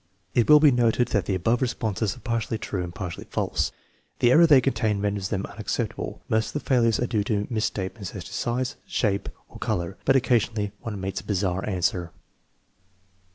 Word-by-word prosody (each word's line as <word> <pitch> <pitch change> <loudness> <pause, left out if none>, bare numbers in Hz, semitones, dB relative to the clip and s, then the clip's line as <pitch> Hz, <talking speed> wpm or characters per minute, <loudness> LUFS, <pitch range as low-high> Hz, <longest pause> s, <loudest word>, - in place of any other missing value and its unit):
It 120 +2 +2
will 150 0 +9
be 150 -1 +6
noted 120 0 +2
that 100 -3 +1
the 95 - 0
above 115 +8 +1
responses 110 -4 -1
are - - -15
partly 115 -1 -1
true 100 -2 -3
and 85 - -5
partly 90 0 -6
false. - - -1 0.5
The 120 - +4
error 170 +5 +7
they 145 -4 +7
contain 110 -5 0
renders 100 -1 -1
them 100 -1 -2
unacceptable. 105 - -4
Most 110 0 +1
of - - -8
the 150 - -4
failures 115 -4 +3
are 125 - +1
due 110 -3 0
to 105 -2 0
misstatements 105 -2 -3
as - - -5
to - - -10
size, 125 +1 -2
shape, 100 -3 0 0.2
or - - -13
color, 85 +1 -2
but 135 - +3
occasionally 115 -5 +1
one 105 -3 -5
meets 95 +1 -3
a - - -19
bizarre 95 -2 -1
answer. 90 -2 -1
110 Hz, 190 wpm, -25 LUFS, 95-120 Hz, 0.5 s, will